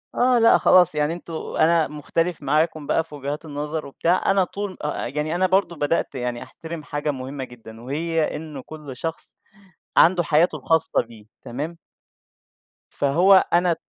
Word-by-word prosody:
آه 250 -1 +3
لا، 230 - +6
خلاص 180 -3 +5
يعني 150 +2 +1
أنتُم 170 -1 -9 0.3
أنا 165 0 +4
مختلِف 165 +3 -2
معاكُم 155 +1 0
بقى 165 - +2
في 150 -2 -11
وجهات 145 +3 -5
النظر 150 +1 -4
وبتاع، 170 +7 +1
أنا 195 -1 +3
طول 200 +1 -5
أأ 150 -5 -2
يعني 150 +5 -2
أنا 185 +1 +2
برضه 185 -2 +1
بدأت 145 -1 -1
يعني 125 -1 -3
أحترم 165 -1 -9
حاجة 145 +1 -2
مهمَّة 135 0 -6
جدًا، 115 -2 -12
وهي 160 +5 -1
إنه 150 -3 -7
كل 150 -4 -9
شخص 165 +4 -6 0.6
عنده 175 0 +5
حياته 155 +2 +2
الخاصَّة 160 +2 +1
بيه، 115 -2 -15 0.2
تمام؟ 150 +8 -5 1.1
فهو 165 +8 +3 0.2
أنا 175 0 +3
155 Hz, 155 wpm, -23 LUFS, 145-170 Hz, 1.1 s, لا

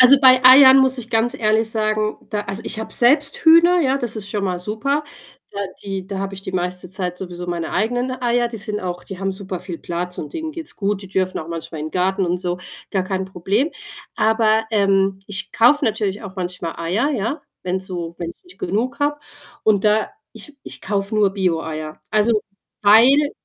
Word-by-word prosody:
Also, 255 +2 +8
bei 255 -1 +7
Eiern 265 +1 +9
muss 265 -1 +3
ich 235 -1 -7
ganz 230 +3 +1
ehrlich 220 -1 +1
sagen, 215 -1 0
da 210 -1 -1
also 195 +3 -2
ich 220 - -2
habe 220 - -5
selbst 285 +4 +3
Hühner, 340 +2 +6
ja, 275 -2 +1
das 235 -3 -3
ist 205 -2 -4
schon 205 -2 -2
mal 180 -2 -1
super. 220 +11 -2 0.5
Da 200 - -6 0.2
die 195 -2 -5
da 195 -1 -5
habe 195 0 -4
ich 190 - -6
die 190 - -6
meiste 180 0 -2
Zeit 180 -1 -4
sowieso 180 -1 -7
meine 170 -2 -3
eigenen 245 +6 0
Eier, 240 0 +1
die 230 - -7
sind 210 0 -2
auch, 180 -1 -5
die 195 - -8
haben 195 0 -2
super 190 -2 -6
viel 180 -2 -6
Platz 175 +1 -4
und 150 - -6
denen 320 -1 -5
geht's 325 -1 -7
gut. 205 -1 -1
Die 195 - -10
dürfen 185 -1 -1
auch 160 - -7
manchmal 165 -1 -6
in 155 +1 -5
Garten 190 +1 0
und 175 0 -1
so, 180 0 -3 0.3
gar 190 - 0
kein 190 0 -3
Problem. 195 - -1 0.4
Aber, 220 0 +2
ähm, 195 -2 +2
ich 200 -1 -3
kaufe 275 +5 +4
natürlich 210 -2 -1
auch 195 -2 -9
manchmal 180 -2 -4
Eier, 190 - 0
ja, 270 +4 -2 0.2
wenn 185 +1 -2
so 175 -3 -6
wenn 170 -1 -4
ich - - -17
nicht 360 - -17
genug 220 +8 -2
habe 290 +1 0 0.4
und 210 -2 +2
da 210 +1 +2 0.2
ich 295 -2 -11
ich - - -9
kaufe 200 +1 -2
nur 210 -2 +3
Bioeier. 160 -5 -3
Also, 215 0 +2 0.4
weil 250 +8 +6
205 Hz, 205 wpm, -20 LUFS, 185-240 Hz, 0.5 s, Eiern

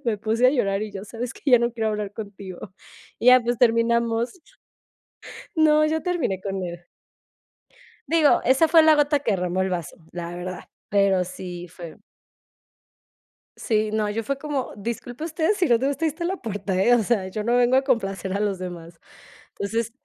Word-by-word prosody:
me 225 -3 0
puse 225 +4 +2
a - - +6
llorar 205 -7 0
y 210 - -9
yo: 195 -1 -6
"¿Sabes 230 +3 -6
qué? - - -16
Ya 245 - +8
no 235 0 0
quiero 225 -2 -1
hablar 210 -1 -4
contigo." 200 -3 -9 0.5
Y 240 - -3
ya, 255 0 +8
pues 240 0 -2
terminamos. 235 - +1 1.2
No, 305 -1 +4
yo 315 +1 0
terminé 330 - -1
con 195 -2 -4
él. 175 0 -7 1.2
Digo, 320 -3 +4
esa 265 +6 +4
fue 325 -1 +7
la 315 -1 +6
gota 290 0 +2
que 235 -6 -1
derramó 180 -1 -1
el 190 - 0
vaso, 175 -3 -4 0.2
la 175 -1 -5
verdad, 180 +1 -7 0.2
pero 195 -2 +2
sí 180 -1 -8
fue. 170 -1 -11 1.6
Sí, 215 -2 0
no, 215 -1 0
yo 225 +2 -3
fue 275 +4 -2
como: 285 -2 -3
"Disculpe 235 +6 -6
usted, 320 +1 -1
si 365 - +2
no 235 -1 +4
te 270 - 0
gusta 285 +3 -1
ahí - - +3
esta 330 +4 -6
la 375 +2 -2
puerta, 205 -4 -3
¿eh?". 240 +5 +4
O 240 - +4
sea, 200 -4 0
yo 210 +3 -4
no 240 +2 +1
vengo 245 +1 +4
a 265 - +5
complacer 195 -8 -1
a 200 - -1
los 205 -3 -1
demás. 170 -2 -8 0.6
Pues 200 +1 -4
sis. 230 0 -1
225 Hz, 190 wpm, -24 LUFS, 190-260 Hz, 1.6 s, Ya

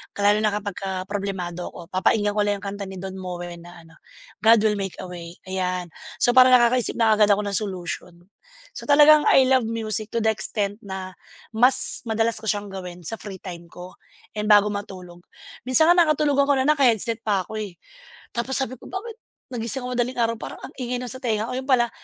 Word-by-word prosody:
Lalo 205 +1 +3
na 210 -1 0
kapagka 195 -2 -4
problemado 190 -3 -5
ako 175 0 -12
papakinggan 205 +3 +1
ko 210 0 0
lang 205 - +1
yung - - -8
kanta 200 -1 -6
ni 190 - -9
Don 190 +1 -7
Moen 175 -2 -7
na 175 0 -14
ano, 165 0 -20 0.4
"God 225 0 +5
will 210 -2 +1
make 195 -2 -4
a - - -7
way" 170 -1 -9 0.2
ayan. 180 -2 -3 0.2
So 245 - +3
parang 255 0 +7
nakakaisip 240 0 +2
na 225 -2 +3
kaagad 210 -1 +4
ako 210 - -3
ng 200 -1 0
solution. 180 -3 -6 0.6
So - - -8
talagang 295 +1 +6
I 265 - +6
love 260 -3 +3
music 220 -1 -1
to - - +2
the 220 - +3
extent 205 0 -1
na, 190 -1 -7 0.4
mas 245 +4 +4
madalas 225 +1 +1
ko 220 - -11
siyang 205 -1 -1
gawin 180 -2 -8
sa 220 +8 -4
free 195 -3 -8
time 175 -2 -9
ko 180 0 -11 0.4
and 210 0 -3
bago 210 -1 +6
matulog. 185 -4 -8 0.4
Minsan 315 +7 +6
nga - - +5
nakatulogan 300 -4 +3
ko 285 - +4
na 260 - 0
naka-headset 235 -6 +2
pa 200 -3 +1
ako, 220 - -7
eh. 200 -4 -7 0.6
Tapos 240 +3 -1
sabi 260 -2 -3
ko - - -16
"Bakit, 440 +4 -6 0.4
nagising 235 +3 -2
ako 250 - -4
madaling 245 +1 -2
araw 230 0 +1
parang - - -8
ang - - -9
ingay 250 -1 -3
nasa 250 +1 -5
tenga 220 -1 -1
ko." 250 - -4
'Yun 265 +1 -8
pala, 240 -3 +3
210 Hz, 205 wpm, -23 LUFS, 190-240 Hz, 0.6 s, parang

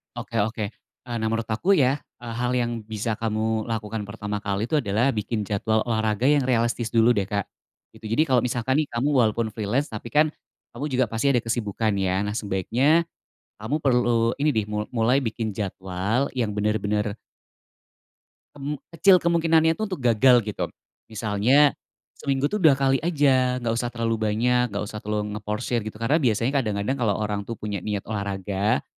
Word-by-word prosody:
Oke - - -7
oke, 110 +1 -3 0.4
eee, 120 - -4
nah 115 - -3
menurut 115 -1 -2
aku 115 - 0
ya 140 -8 +4 0.2
hal 120 +1 -3
yang 120 -2 -1
bisa 110 +1 -3
kamu 110 0 -1
lakukan 110 -1 -4
pertama 105 0 -5
kali 100 +2 -1
itu 155 - 0
adalah 110 +4 +1
bikin 105 -1 -2
jadwal 110 +2 +1
olahraga 110 +1 +1
yang 145 -1 +4
realistis 120 -2 0
dulu 115 +1 +4
deh 100 - +1
Kak, 100 +1 -3 0.5
gitu 110 -1 -8
jadi 155 +8 +2
kalau 130 -3 +3
misalkan 125 +1 0
nih 145 - -12
kamu 120 +4 0
walaupun 115 -5 +2
freelance 115 +7 -1
tapi 110 +2 -8
kan, 150 +1 +4 0.5
kamu 145 - -4
juga 130 -1 +2
pasti 115 +6 +1
ada 125 - +3
kesibukan 110 -2 -1
ya? 95 -1 0
Nah 105 - -3
sebaiknya, 120 - +1 0.6
kamu 135 +8 -1
perlu 120 -4 +2
ini 150 - +4
nih 110 -6 0
mu 105 0 -2
mulai 125 +3 +2
bikin 110 -3 -3
jadwal 95 +5 -2
yang 120 -5 0
bener-bener 105 0 -1 1.4
Mmm, 145 +1 -4 0.2
kecil 175 +4 +5
kemungkinannya 165 -1 +3
itu - - -1
untuk 185 -9 -6
gagal 120 +1 +5
gitu, 105 -1 -3 0.4
misalnya, 110 +7 +3 0.5
seminggu 140 0 0
tuh 210 - -1
2x 135 -5 +4
aja 140 -6 +2
nggak 115 - 0
usah 120 0 -1
terlalu 115 -1 -1
banyak 125 +3 +2
nggak 100 -1 -3
usah 105 +1 -7
terlalu 105 0 -2
ngeporsir 105 +3 -2
gitu 110 0 -7
karena 140 +9 +1
biasanya 115 -1 +1
kadang-kadang 105 +1 -1
kalo 105 -4 +2
orang 105 -1 -2
tuh 115 - -4
punya 105 -2 -3
niat 105 -2 -2
olahraga, 100 -3 -1
115 Hz, 170 wpm, -24 LUFS, 105-130 Hz, 1.4 s, kecil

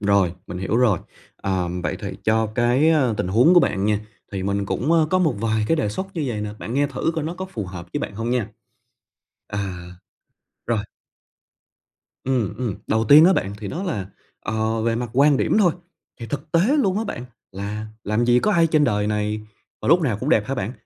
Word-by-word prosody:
rồi, 100 -4 +2
mình 90 - -6
hiểu 95 +4 -1
rồi. 115 -7 +3 0.4
Ừm, 90 -2 -1
vậy - - -2
thì - - -4
cho 110 0 +2
cái, 125 +6 +3
ờ, 135 -8 +2
tình 90 - -2
huống 120 - +5
của 175 - +8
bạn 100 -9 0
nha, 105 0 +1 0.3
thì 95 -2 -3
mình 100 +1 -1
cũng, 140 - 0
ơ, 160 -2 +4
có 185 - +3
một 160 -8 +2
vài 110 0 0
cái 165 - +3
đề 150 - 0
xuất 190 - -4
như 160 -4 -2
vầy 115 -5 -3
nè, 105 0 -3
bạn 115 - -5
nghe 145 +1 +2
thử 140 +3 -1
coi 160 -2 -2
nó 165 - -3
có 185 - -5
phù 115 - -6
hợp 90 -1 -8
với - - -2
bạn - - -5
hông 115 +3 -3
nha. 125 -5 0 1.0
À. 105 - -5 1.1
Rồi. 115 -1 +1 1.5
Ừm, 125 -6 0
ừm, 120 -7 -2
đầu 110 +1 +1
tiên 145 +8 +8
á 185 - +6
bạn 100 - -1
thì 100 -2 -6
đó 175 - -4
là, 130 - -3 0.3
ờ, 110 0 -1
về 115 0 +1
mặt 120 0 -3
quan 140 +2 +4
điểm - - +1
thôi, 180 -6 +4 0.5
thì 115 - -5
thực 145 +4 -6
tế 165 - +4 0.2
luôn 200 -7 +2
á 225 - -2
bạn 125 - -5 0.3
là 105 +3 -5 0.2
làm 105 +3 +1
gì 120 0 +4
có 210 - +2
ai 170 -3 +4
trên 155 -2 +3
đời 105 -5 +1
này 105 0 -1 0.4
mà - - -2
lúc 170 +4 +6
nào 130 -10 0
cũng - - -2
đẹp 105 -1 +3
hả 135 - -2
bạn, 115 -3 -3
115 Hz, 225 wpm, -22 LUFS, 105-150 Hz, 1.5 s, của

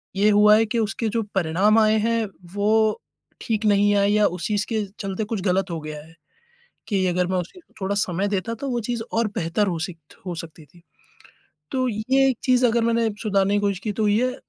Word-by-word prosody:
ये 205 +2 +3
हुआ 210 +1 +6
है 225 - +3
कि 230 +1 -2
उसके 220 +1 -1
जो 230 +2 -1
परिणाम 190 +5 +2
आए 215 0 +4
हैं, 230 +1 0 0.3
वो 215 +1 +2 0.4
ठीक 220 -1 -2
नहीं 205 0 +4
आए 200 0 +3
या 210 0 +3
उस 180 0 -5
चीज़ 205 -1 0
के 220 -2 0 0.2
चलते 195 0 -3
कुछ 210 -1 -3
गलत 190 0 0
हो 165 - -3
गया 155 0 -7
है, 165 - -18 0.7
कि 195 -3 0
अगर 180 0 0
मैं 185 0 -1
उसे 180 - -5 0.2
थोड़ा 195 +1 -1
समय 195 -1 0
देता, 200 +2 -2
तो 275 +4 -5
वो 240 -2 -1
चीज़ 235 +1 -3
और 230 -1 +1
बेहतर 175 +5 0
हो 170 -3 -2
सिक्त 160 -2 -8
हो 180 -2 -4
सकती 160 -1 -9
थी। 170 +3 -22 0.9
तो 255 -1 0
ये 260 +5 +2
एक 260 - 0
चीज़ 255 -1 +3
अगर 235 0 +1
मैंने 230 0 +2
सुधारने 200 -2 +1
की 205 - +2
कोशिश 200 -2 0
की 210 - -1
तो 215 +1 -1
ये 245 +5 +1
205 Hz, 215 wpm, -23 LUFS, 185-225 Hz, 0.9 s, हुआ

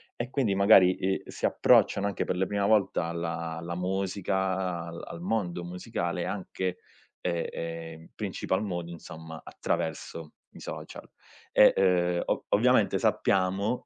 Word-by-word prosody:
E 120 +1 -4
quindi 115 -9 +1
magari, 95 -2 +6
eh, 95 +1 -1
si - - -4
approcciano 100 0 +4
anche 100 - -2
per - - -1
le 95 +1 0
prima 100 -1 0
volta 105 -5 +2
alla 85 -1 -3
alla 85 +1 -5
musica 95 +1 -1
a 90 -3 -2
al 85 0 -8
al 85 - -8
mondo 90 -3 -1
musicale 90 +1 -3
anche 90 -1 -3 0.4
e, 85 -2 -1
ehm, 80 -1 -6
in - - -16
principal 95 +3 -2
modo 85 -4 -4
insomma 80 -1 -9
attraverso 80 0 -4 0.2
i - - -10
social - - -8 0.4
e, - - +7
ehm, 90 -2 +2
o - - -1
ovviamente - - +4
sappiamo 100 +5 +1
90 Hz, 145 wpm, -28 LUFS, 85-95 Hz, 0.4 s, e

